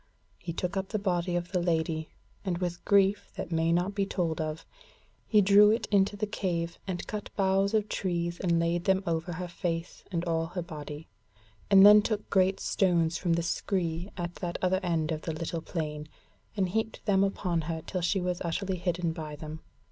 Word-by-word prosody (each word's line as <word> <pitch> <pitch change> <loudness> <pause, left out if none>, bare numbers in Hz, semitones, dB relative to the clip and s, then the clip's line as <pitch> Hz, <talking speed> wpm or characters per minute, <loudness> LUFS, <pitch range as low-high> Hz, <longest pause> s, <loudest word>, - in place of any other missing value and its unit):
He 175 - -5
took 180 +3 -3
up 190 0 -2
the 215 - -1
body 180 -3 0
of 175 0 -2
the 180 -2 +1
Lady 160 -2 0 0.3
and 185 -4 -1
with 175 -1 -3
grief 200 0 +3
that - - -5
may 165 0 +2
not 175 +4 +1
be 200 -1 0
told 170 -5 -1
of, 155 0 -4 0.6
he 210 -2 +5
drew 205 +2 +7
it 225 +2 +1
into 200 0 +3
the 215 - 0
cave, 170 -5 -2
and 180 -2 -3
cut 210 -1 -5
boughs 195 +1 +2
of 215 -1 +1
trees 170 -3 -2
and 170 -2 +2
laid 170 +1 0
them 190 0 +3
over 170 +1 -1
her 180 +2 -4
face 170 -1 -4
and 170 -1 -1
all 165 -1 0
her 180 +1 -4
body, 150 -1 -8 0.6
and 195 -1 +8
then 210 0 +9
took 210 0 -2
great 190 0 +3
stones 170 -4 +1
from 175 -3 +1
the 170 0 +1
scree 175 0 -1
at 175 -1 -3
that 175 -2 -3
other 185 0 +2
end 165 -3 0
of 155 -1 -2
the 160 - -3
little 165 +1 -3
plain, 150 -2 -4 0.5
and 190 -2 +1
heaped 220 +3 -2
them 195 -2 +3
upon 180 -4 0
her 160 -1 -3
till 185 - -3
she 175 +3 +1
was 180 -1 -2
utterly 185 +3 -2
hidden 175 -1 -1
by 155 -3 -6
them. 155 +1 -7
175 Hz, 200 wpm, -29 LUFS, 165-195 Hz, 0.6 s, then